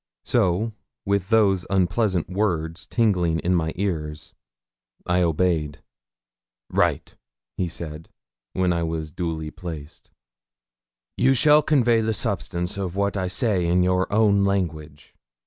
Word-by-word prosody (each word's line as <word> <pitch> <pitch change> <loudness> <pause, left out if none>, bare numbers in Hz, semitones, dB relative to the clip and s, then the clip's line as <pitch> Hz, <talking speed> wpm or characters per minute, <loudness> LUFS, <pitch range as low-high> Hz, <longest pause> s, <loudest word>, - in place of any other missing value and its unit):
So, 110 0 +1 0.3
with 100 -1 0
those 100 -5 +3
unpleasant 95 -1 +1
words 85 -4 -2
tingling 90 -8 +1
in 90 - +1
my 80 -2 +1
ears, 75 -6 -4 0.7
I 90 0 +2
obeyed. 80 -3 0 0.9
'Write,' - - 0 0.5
said 80 -1 -7 0.5
he, - - -4
when 90 -1 +3
I 85 - -1
was 80 -2 -3
duly 80 -2 -4
placed. 80 -4 -9 1.1
'You 135 +1 +4
shall 150 +4 +5
convey 120 -6 +3
the 110 0 -1
substance 95 -4 -3
of 95 -2 -3
what 100 0 0
I 95 -2 -1
say 95 -2 0
in 90 +1 +3
your 90 +1 +1
own 100 -1 +3
language. 80 -7 -3
90 Hz, 125 wpm, -23 LUFS, 80-100 Hz, 1.1 s, shall